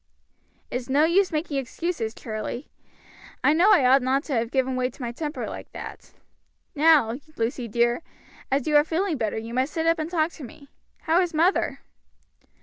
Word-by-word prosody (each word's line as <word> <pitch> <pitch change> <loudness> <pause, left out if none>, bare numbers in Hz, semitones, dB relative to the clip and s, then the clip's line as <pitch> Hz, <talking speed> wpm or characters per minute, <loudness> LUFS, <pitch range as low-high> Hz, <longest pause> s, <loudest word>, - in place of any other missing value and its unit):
"It's 250 0 -4
no 285 +3 +4
use 360 +4 +3
making 305 -2 -2
excuses, 260 -3 -3
Charlie. 225 +4 -6 0.7
I 295 - +5
know 355 +7 +5
I 345 -11 +5
ought 265 +2 +6
not 265 +3 +1
to 300 - -4
have 230 -1 0
given 260 0 0
way 255 0 0
to 260 - -18
my 235 - -3
temper 295 0 -4
like - - -8
that. - - -9 0.6
Now, 290 -6 +4 0.2
Lucy 235 +1 -2
dear, 235 +4 +1 0.5
as 275 -1 0
you 300 - +1
are 295 - +6
feeling 330 +1 -1
better, 220 -3 -2
you 225 +1 -6
must 260 +4 0
sit 325 0 -1
up 330 0 +3
and 310 +1 -3
talk 330 -1 +1
to 305 - -11
me. 280 +2 -12 0.3
How 335 +3 +3
is 350 -3 -2
mother?" 340 +5 +1
280 Hz, 185 wpm, -25 LUFS, 245-325 Hz, 0.7 s, ought